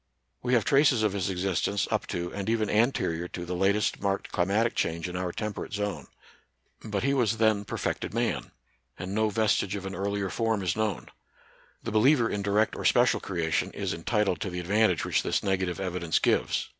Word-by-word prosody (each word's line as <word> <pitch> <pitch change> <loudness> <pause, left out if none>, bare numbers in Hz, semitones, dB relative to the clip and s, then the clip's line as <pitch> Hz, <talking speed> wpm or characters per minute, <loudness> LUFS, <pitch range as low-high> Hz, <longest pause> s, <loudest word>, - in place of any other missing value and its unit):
We 125 0 +2
have 115 - +2
traces 135 -5 +4
of 105 -3 +1
his 100 -2 -1
existence 95 +2 0
up - - 0
to 85 0 -4
and 100 +1 -3
even 110 -2 +1
anterior 105 -7 +1
to 85 0 -6
the 90 - -4
latest 100 +3 +1
marked 100 -1 -1
climatic 105 +6 +1
change 85 +1 -1
in 90 - -6
our 90 -1 -2
temperate 105 +2 -5
zone: 105 -2 -3 0.8
but 105 -2 -3
he 140 +1 +2
was 115 -5 +1
then 110 -2 +2
perfected - - -3
man; - - -1 0.5
and 95 +1 -5
no 110 +1 +2
vestige 105 -2 +1
of 100 -1 -5
an 95 - -5
earlier 100 +1 -2
form 115 -3 0
is 90 -2 0
known. 110 -5 -2 0.7
The - - -4
be 110 - +3
liever 125 0 +4
in 105 -3 -2
direct 105 +2 +1
or - - -5
special - - +4
creation 85 -4 -1
is - - -2
entitled 95 +2 0
to 100 - -2
the 90 0 -4
advantage 95 -2 +2
which - - +1
this - - -1
negative 95 -3 -1
evidence 90 -4 -1
gives. - - +1
100 Hz, 195 wpm, -28 LUFS, 90-110 Hz, 0.8 s, traces